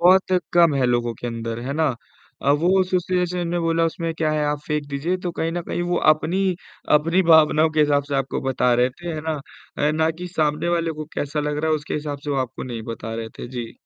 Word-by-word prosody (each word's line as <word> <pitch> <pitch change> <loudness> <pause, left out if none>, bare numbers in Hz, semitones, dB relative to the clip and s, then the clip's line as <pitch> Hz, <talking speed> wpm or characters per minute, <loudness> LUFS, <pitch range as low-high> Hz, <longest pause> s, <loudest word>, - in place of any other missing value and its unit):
बहुत 185 +2 +5 0.2
कम 170 -3 +5
है 135 -2 +2
लोगों 120 -1 +1
के 120 - -7
अंदर। 115 -1 -4
है 130 +3 -4
ना? 160 +2 +1 0.6
अ, 140 - +3
वो 175 +6 +3
एसोसिएशन 180 -1 0
ने 175 +1 -1
बोला 165 0 +2
उसमें 165 0 -3
क्या 160 -1 0
है 150 -1 0
आप 150 0 0
फेंक 150 -1 -1
दीजिए, 145 +6 -1
तो 180 -1 -4
कहीं 165 0 -2
न 175 0 -2
कहीं 175 - -3
वो 175 - +2 0.2
अपनी, 180 +4 -1 0.4
अपनी 165 +5 +2
भावनाओं 155 0 +5
के 155 - +1
हिसाब 145 -1 +3
से 145 0 -4
आपको 135 -1 -1
बता 125 -1 +2
रहे 125 +1 +3
थे। 170 +6 -7
है 155 - -4
ना, 155 -2 -3 0.5
ना 160 +1 +2
कि 175 +3 -7
सामने 155 -1 0
वाले 170 -1 +1
को - - -3
कैसा 145 +1 -2
लग 150 0 -2
रहा 160 +1 0
है, 155 - +3
उसके 150 0 -6
हिसाब 150 -1 -3
से 145 - -3
वह 140 -2 +1
आपको 130 -2 -4
नहीं 120 -3 -5
बता 110 0 -6
रहे 115 0 -4
थे। - - -5
जी। 115 -2 -4
155 Hz, 240 wpm, -22 LUFS, 140-170 Hz, 0.6 s, बहुत